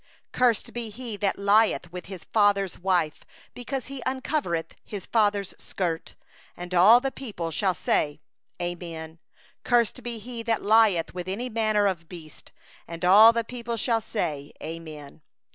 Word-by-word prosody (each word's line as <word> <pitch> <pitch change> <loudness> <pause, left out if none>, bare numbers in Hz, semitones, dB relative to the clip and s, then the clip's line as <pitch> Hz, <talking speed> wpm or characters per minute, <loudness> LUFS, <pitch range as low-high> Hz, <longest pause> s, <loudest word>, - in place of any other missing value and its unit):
20Cursed 245 -4 +1
be 235 -2 -4
he 230 0 -6
that 200 -1 0
lieth 200 -3 +3
with 180 0 -8
his 190 -3 -8
father's 200 -3 +1
wife; 180 -4 0 0.3
because 255 +1 -5
he 275 +1 -8
hath 250 - -5
uncovered 260 - -2
his 200 -3 -7
father's 205 -3 +1
skirt. 170 -4 -4 0.4
And 175 +1 -7
all 200 +7 +7
the 270 +1 -2
people 200 -13 -6
shall 185 +3 0
say: 145 -1 0 0.4
Amen. 170 -2 -6 0.4
27 240 0 +2
21Cursed - - -22
be 240 -1 -4
he 235 +2 -7
that 230 -1 -1
lieth 210 -5 +4
with 180 0 -6
any 225 +7 -3
manner 215 -2 +1
of 170 -4 -2
beast. 160 -4 -12 0.4
And 170 +1 -5
all 210 +5 +9
the 230 0 -1
people 235 0 -5
shall 225 +1 +1
say: 150 -10 -3
Amen. 155 -3 -9
200 Hz, 160 wpm, -26 LUFS, 175-230 Hz, 0.4 s, all